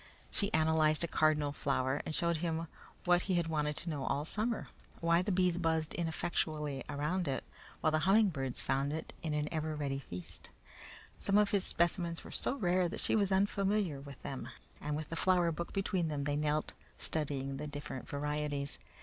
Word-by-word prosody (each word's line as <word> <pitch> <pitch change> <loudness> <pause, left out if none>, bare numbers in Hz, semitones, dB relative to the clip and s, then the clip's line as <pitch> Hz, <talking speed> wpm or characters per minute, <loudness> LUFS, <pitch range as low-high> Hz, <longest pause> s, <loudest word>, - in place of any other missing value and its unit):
She 200 0 +1
analyzed 155 -1 +3
a - - +1
cardinal 155 -2 +3
flower 135 -1 0
and 155 - -2
showed 170 -2 +1
him 165 0 -1 0.4
what 175 0 +5
he 190 -1 0
had 170 -1 +2
wanted 150 -2 0
to 170 - -1
know 145 -3 -3
all 140 +2 0
summer 220 +6 -1 0.3
why 170 +1 +4
the 200 +3 -1
bees 180 -1 +2
buzzed 160 -2 +1
ineffectually 155 -4 -1
around 150 +5 -1
it 135 - -1 0.4
while 155 - +3
the 155 - +3
humming 200 +5 +5
birds 135 -6 -2
found 135 +2 +1
in 155 - -1
it - - -7
an 150 -2 0
ever 155 -1 -1
ready 140 -2 -2
feast. 90 -9 -9 0.7
Some 200 0 +3
of 210 0 +4
his 200 -3 +2
specimens 170 0 +1
were - - -10
so 260 - +2
rare 180 -6 +2
that - - -5
she - - +3
was 200 -3 +2
unfamiliar 195 -5 +2
with 140 0 -10
them, 135 -2 -5 0.3
and 150 0 -2
with 155 0 -4
the 165 - -3
flower 175 -1 +3
book 170 +2 -4
between 185 -3 0
them 145 -2 -2
they 145 0 0
knelt, 150 +1 0 0.3
studying 140 -3 -1
the 150 +2 -4
different 145 -3 -6
varieties. 145 -1 -2
155 Hz, 190 wpm, -34 LUFS, 145-175 Hz, 0.7 s, what